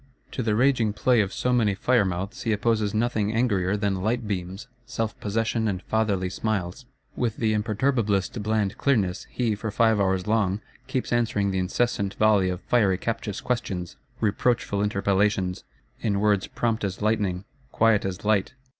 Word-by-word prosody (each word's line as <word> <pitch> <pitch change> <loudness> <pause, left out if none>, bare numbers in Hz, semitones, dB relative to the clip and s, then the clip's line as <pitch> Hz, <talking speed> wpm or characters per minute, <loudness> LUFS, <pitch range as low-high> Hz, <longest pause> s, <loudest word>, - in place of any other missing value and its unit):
To - - -3
the 110 -3 +1
raging 120 -3 +2
play 120 +2 +3
of 100 -2 -2
so 125 +4 0
many 110 -5 +2
fire 125 +4 +3
mouths 95 +4 -4
he 115 - -1
opposes 105 -1 +1
nothing 110 -1 0
angrier 105 -5 +1
than 100 -2 -1
light 115 +3 -1
beams, 95 +3 -4 0.2
self 115 -1 -3
possession 110 +2 -1
and 95 -3 -2
fatherly 105 -4 0
smiles. 105 +4 -3 0.3
With 115 -3 -1
the 110 -2 +1
imperturbablest 110 -1 0
bland 105 -1 -1
clearness, 105 -9 +1
he, 120 -3 0
for 105 +2 -4
five 110 0 +3
hours 95 -2 +1
long, 105 -3 +1 0.3
keeps 130 -2 -2
answering 110 -4 +1
the 95 - -1
incessant 100 +1 -1
volley 105 -3 +3
of 90 0 -4
fiery 100 -6 +2
captious 105 -1 -3
questions, 95 -8 -3 0.2
reproachful 110 -1 +1
interpellations; 100 -2 0 0.3
in 100 -3 0
words 105 -2 +2
prompt 115 -2 -1
as 95 0 -3
lightning, 105 -4 0 0.3
quiet 115 -2 +3
as 95 +1 -4
light. 105 +2 +2
105 Hz, 160 wpm, -25 LUFS, 95-115 Hz, 0.3 s, play